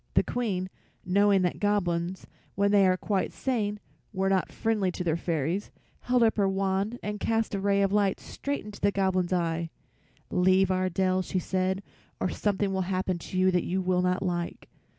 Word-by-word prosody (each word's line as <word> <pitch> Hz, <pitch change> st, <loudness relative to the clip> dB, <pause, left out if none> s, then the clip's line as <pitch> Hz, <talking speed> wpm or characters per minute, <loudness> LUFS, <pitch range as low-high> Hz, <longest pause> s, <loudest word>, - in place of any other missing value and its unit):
The -, -, +5 dB
Queen, 200 Hz, -7 st, -2 dB, 0.4 s
knowing 200 Hz, +1 st, +4 dB
that 180 Hz, -, -1 dB
Goblins, 185 Hz, -3 st, 0 dB, 0.3 s
when 200 Hz, +1 st, +2 dB
they 200 Hz, -2 st, +5 dB
were 185 Hz, 0 st, +3 dB
quite 195 Hz, 0 st, -1 dB
sane, 210 Hz, -6 st, -2 dB, 0.3 s
were 195 Hz, -1 st, 0 dB
not 190 Hz, -2 st, +1 dB
friendly 210 Hz, -5 st, 0 dB
to 180 Hz, -, -4 dB
her 165 Hz, -2 st, +1 dB
fairies, 170 Hz, +3 st, -2 dB, 0.3 s
held 250 Hz, -1 st, +2 dB
up 225 Hz, -1 st, +3 dB
her 200 Hz, -2 st, +3 dB
wand 195 Hz, +3 st, 0 dB
and 210 Hz, 0 st, -3 dB
cast 225 Hz, 0 st, 0 dB
a 200 Hz, -, -1 dB
ray 200 Hz, 0 st, +2 dB
of 195 Hz, 0 st, +1 dB
light 200 Hz, -2 st, +2 dB
straight 285 Hz, -5 st, -4 dB
into 210 Hz, -1 st, -10 dB
the 200 Hz, -, +3 dB
Goblin's 190 Hz, -2 st, 0 dB
eye. 170 Hz, -2 st, 0 dB, 0.6 s
"Leave 185 Hz, +1 st, +3 dB
our 185 Hz, 0 st, +1 dB
dell," 185 Hz, +1 st, +1 dB
she 185 Hz, -, -3 dB
said, 185 Hz, +2 st, -1 dB, 0.4 s
"or 185 Hz, -, 0 dB
something 200 Hz, 0 st, 0 dB
will 190 Hz, -, 0 dB
happen 185 Hz, -1 st, -1 dB
to 185 Hz, -, -6 dB
you 185 Hz, 0 st, +4 dB
that 180 Hz, -1 st, +1 dB
you 185 Hz, +2 st, -1 dB
will 180 Hz, -1 st, +1 dB
not 180 Hz, +1 st, 0 dB
like." 175 Hz, -2 st, -3 dB
190 Hz, 190 wpm, -28 LUFS, 185-205 Hz, 0.6 s, The